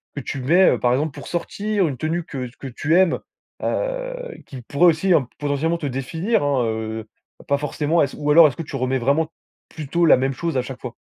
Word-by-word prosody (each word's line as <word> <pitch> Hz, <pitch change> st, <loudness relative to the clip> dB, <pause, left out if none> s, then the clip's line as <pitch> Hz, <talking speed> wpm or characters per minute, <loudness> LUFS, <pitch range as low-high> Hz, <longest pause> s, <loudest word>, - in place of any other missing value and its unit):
que -, -, -3 dB
tu 135 Hz, 0 st, -5 dB
mets, 175 Hz, +8 st, +5 dB
heu, -, -, 0 dB
par 120 Hz, -, +2 dB
exemple, 145 Hz, +5 st, 0 dB
pour -, -, -8 dB
sortir, 200 Hz, +2 st, -1 dB
une 140 Hz, -, -3 dB
tenue 165 Hz, +4 st, -2 dB
que 130 Hz, -6 st, -5 dB
que 135 Hz, -, -6 dB
tu 145 Hz, +6 st, 0 dB
aimes, 185 Hz, -3 st, +3 dB, 0.4 s
heu, -, -, -2 dB, 0.3 s
qui 130 Hz, -4 st, -9 dB
pourrait 140 Hz, +8 st, +3 dB
aussi, 175 Hz, +3 st, +3 dB, 0.3 s
potentiellement 145 Hz, +3 st, 0 dB
te 165 Hz, -, -6 dB
définir, 160 Hz, -, -1 dB
hein, 140 Hz, -3 st, +1 dB
heu, 110 Hz, 0 st, -4 dB, 0.4 s
pas 140 Hz, -, +2 dB
forcément, 150 Hz, +3 st, 0 dB
est-ce 140 Hz, -, 0 dB
ou 150 Hz, 0 st, -2 dB
alors 160 Hz, +2 st, +8 dB
est-ce 130 Hz, -, -10 dB
que 165 Hz, -, -4 dB
tu 145 Hz, -, -8 dB
remets 130 Hz, 0 st, 0 dB
vraiment 145 Hz, +6 st, +1 dB, 0.4 s
plutôt 160 Hz, +3 st, -1 dB
la 160 Hz, -, +7 dB
même 135 Hz, +2 st, 0 dB
chose 165 Hz, +2 st, -2 dB
à -, -, +2 dB
chaque 130 Hz, 0 st, -8 dB
fois? 125 Hz, -2 st, -6 dB
145 Hz, 215 wpm, -22 LUFS, 130-170 Hz, 0.4 s, alors